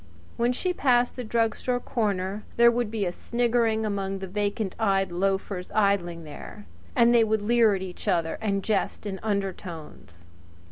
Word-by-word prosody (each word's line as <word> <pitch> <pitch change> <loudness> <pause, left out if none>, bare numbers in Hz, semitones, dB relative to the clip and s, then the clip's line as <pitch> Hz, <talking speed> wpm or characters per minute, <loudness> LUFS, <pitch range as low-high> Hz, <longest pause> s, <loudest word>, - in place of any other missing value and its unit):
When 235 +1 +1
she 360 +9 -1
passed 245 -6 +2
the 250 - -5
drug 225 -1 +1
store 250 -1 -1
corner 205 -4 -2
there 235 0 +7
would 235 -2 -1
be 215 -2 -2
a 175 - -1
sniggering 230 0 0
among 195 -2 -2
the 195 - -5
vacant 205 +1 -2
eyed 195 -4 +1
loafers 190 0 -2
idling 190 -5 +1
there, 145 -8 -10 0.3
and 235 0 +5
they 235 -1 +6
would 220 -1 0
leer 225 -1 +4
at 190 - -4
each 185 +2 -8
other 170 -4 0
and 200 -3 -1
jest 215 0 -1
in 195 -2 -4
undertones. 180 - -5
205 Hz, 170 wpm, -26 LUFS, 190-230 Hz, 0.3 s, there